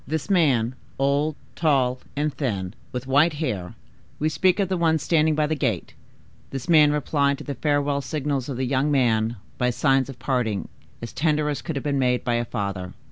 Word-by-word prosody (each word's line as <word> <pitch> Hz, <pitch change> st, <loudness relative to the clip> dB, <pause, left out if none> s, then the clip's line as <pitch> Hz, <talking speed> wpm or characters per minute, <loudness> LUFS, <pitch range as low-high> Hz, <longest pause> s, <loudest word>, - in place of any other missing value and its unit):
This 160 Hz, +6 st, -2 dB
man, 130 Hz, -, +3 dB, 0.2 s
old, 140 Hz, +3 st, +1 dB, 0.2 s
tall, 130 Hz, -5 st, +2 dB, 0.2 s
and 150 Hz, 0 st, 0 dB
thin, 100 Hz, -9 st, -2 dB, 0.2 s
with 125 Hz, 0 st, -4 dB
white 145 Hz, +5 st, +4 dB
hair,—we 135 Hz, -, -5 dB
speak 185 Hz, +4 st, +2 dB
of 195 Hz, -, +2 dB
the 190 Hz, -, -1 dB
one 165 Hz, -2 st, +2 dB
standing 155 Hz, 0 st, +2 dB
by 155 Hz, 0 st, +2 dB
the 155 Hz, -, -1 dB
gate;—this 135 Hz, -2 st, -5 dB
man 155 Hz, -3 st, +6 dB
replied 140 Hz, -1 st, +1 dB
to -, -, -9 dB
the 140 Hz, -, -4 dB
farewell 145 Hz, +1 st, 0 dB
signals 140 Hz, -3 st, -2 dB
of 130 Hz, -, -4 dB
the 130 Hz, -, -1 dB
young 135 Hz, +3 st, +1 dB
one 115 Hz, -4 st, +2 dB, 0.2 s
by 125 Hz, -1 st, +2 dB
signs 135 Hz, +1 st, +2 dB
of 135 Hz, -, -8 dB
parting 125 Hz, -6 st, -1 dB, 0.3 s
as 115 Hz, -, -6 dB
tender 150 Hz, -1 st, +1 dB
as 145 Hz, -2 st, -2 dB
could 160 Hz, -, -4 dB
have 140 Hz, -, -3 dB
been 140 Hz, -2 st, 0 dB
made 125 Hz, -1 st, +1 dB
by 120 Hz, -, 0 dB
a 120 Hz, 0 st, 0 dB
father. 100 Hz, -5 st, -4 dB
140 Hz, 190 wpm, -24 LUFS, 125-150 Hz, 0.3 s, man